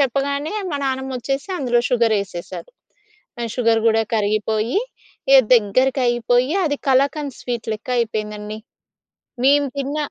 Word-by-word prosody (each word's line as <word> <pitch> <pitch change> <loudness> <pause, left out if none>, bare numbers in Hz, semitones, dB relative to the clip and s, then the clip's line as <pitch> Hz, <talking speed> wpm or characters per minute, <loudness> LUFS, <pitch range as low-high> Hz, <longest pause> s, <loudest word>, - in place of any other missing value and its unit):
చెప్పగానే 280 - 0 0.2
మా 285 - -1
నానమ్మమోచ్చేసి 265 +3 -3
అందులో 240 -2 +2
షుగరెసేసారు. 215 - -1 0.7
ఆ - - -1
షుగర్ 230 -2 +3
కూడా 225 0 +3
కరిగిపోయి 215 - 0 0.5
ఇగ 275 - +9 0.2
దగ్గరికైపోయి, 245 +3 +2
అది 290 -3 0
కళాకంద్ 280 +1 +1
స్వీట్లెక్క 225 -2 -5
అయిపోయిందండి. 215 -1 -4 0.9
మేము 285 0 +4
తిన్న 280 +2 -3
245 Hz, 100 wpm, -20 LUFS, 220-275 Hz, 0.9 s, ఇగ